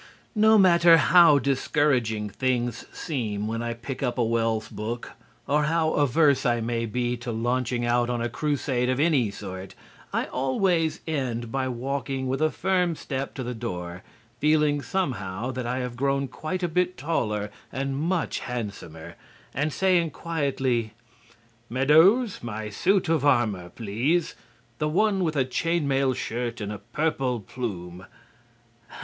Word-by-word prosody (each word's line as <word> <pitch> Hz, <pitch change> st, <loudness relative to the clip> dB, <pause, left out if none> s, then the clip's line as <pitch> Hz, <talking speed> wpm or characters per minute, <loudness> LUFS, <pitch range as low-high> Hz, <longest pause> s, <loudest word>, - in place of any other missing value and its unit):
No 220 Hz, 0 st, +5 dB
matter 170 Hz, -3 st, +7 dB
how 165 Hz, -1 st, +6 dB
discouraging 130 Hz, -5 st, +1 dB
things 120 Hz, -1 st, -1 dB
seem 110 Hz, -8 st, -3 dB
when 115 Hz, +1 st, -2 dB
I 120 Hz, 0 st, -3 dB
pick 125 Hz, +3 st, -7 dB
up 125 Hz, -2 st, -1 dB
a 120 Hz, -, +2 dB
Wells 115 Hz, -1 st, 0 dB
book, 115 Hz, +2 st, -5 dB, 0.3 s
or 150 Hz, +2 st, +2 dB
how 160 Hz, 0 st, +1 dB
averse 145 Hz, 0 st, +3 dB
I 120 Hz, -1 st, +2 dB
may 115 Hz, 0 st, -2 dB
be 120 Hz, +2 st, -1 dB
to 120 Hz, 0 st, -5 dB
launching 120 Hz, +1 st, -1 dB
out 120 Hz, 0 st, +2 dB
on 120 Hz, -1 st, -1 dB
a 120 Hz, -, 0 dB
crusade 130 Hz, +1 st, -1 dB
of 130 Hz, +1 st, 0 dB
any 145 Hz, -8 st, +3 dB
sort, 95 Hz, -1 st, -8 dB, 0.4 s
I -, -, 0 dB
always 160 Hz, +5 st, 0 dB
end 125 Hz, -7 st, -2 dB
by 135 Hz, 0 st, -1 dB
walking 135 Hz, +1 st, -3 dB
with 135 Hz, +3 st, -1 dB
a 155 Hz, -, +4 dB
firm 180 Hz, -1 st, 0 dB
step 135 Hz, -2 st, -5 dB
to 130 Hz, -, -4 dB
the 125 Hz, +1 st, -4 dB
door 90 Hz, -6 st, -5 dB, 0.4 s
(feeling, 150 Hz, -1 st, +3 dB
somehow, 130 Hz, -, -2 dB
that 125 Hz, -1 st, -4 dB
I 125 Hz, +1 st, -1 dB
have 125 Hz, -1 st, -4 dB
grown 140 Hz, +2 st, 0 dB
quite 160 Hz, +8 st, -4 dB
a -, -, +2 dB
bit 180 Hz, +2 st, 0 dB
taller 105 Hz, -8 st, -1 dB, 0.2 s
and 135 Hz, +1 st, -2 dB
much 165 Hz, +4 st, -1 dB
handsomer) 100 Hz, -10 st, -6 dB, 0.4 s
and 150 Hz, +3 st, 0 dB
saying 180 Hz, -1 st, +2 dB
quietly: 135 Hz, -8 st, -1 dB, 0.7 s
"Meadows, 160 Hz, -, +4 dB
my 110 Hz, -2 st, -5 dB
suit 190 Hz, -, +2 dB
of 160 Hz, -3 st, +1 dB
armor, 110 Hz, -10 st, +2 dB
please; 120 Hz, -, -1 dB, 0.5 s
the 150 Hz, -, 0 dB
one 195 Hz, +3 st, +2 dB
with 160 Hz, -2 st, -1 dB
a 135 Hz, -2 st, +2 dB
chain 165 Hz, +4 st, 0 dB
mail 135 Hz, -1 st, +2 dB
shirt 120 Hz, +1 st, -3 dB
and 105 Hz, -1 st, -4 dB
a 105 Hz, -, -7 dB
purple 125 Hz, +2 st, -1 dB
plume." 95 Hz, -6 st, -6 dB
130 Hz, 150 wpm, -26 LUFS, 115-155 Hz, 0.7 s, matter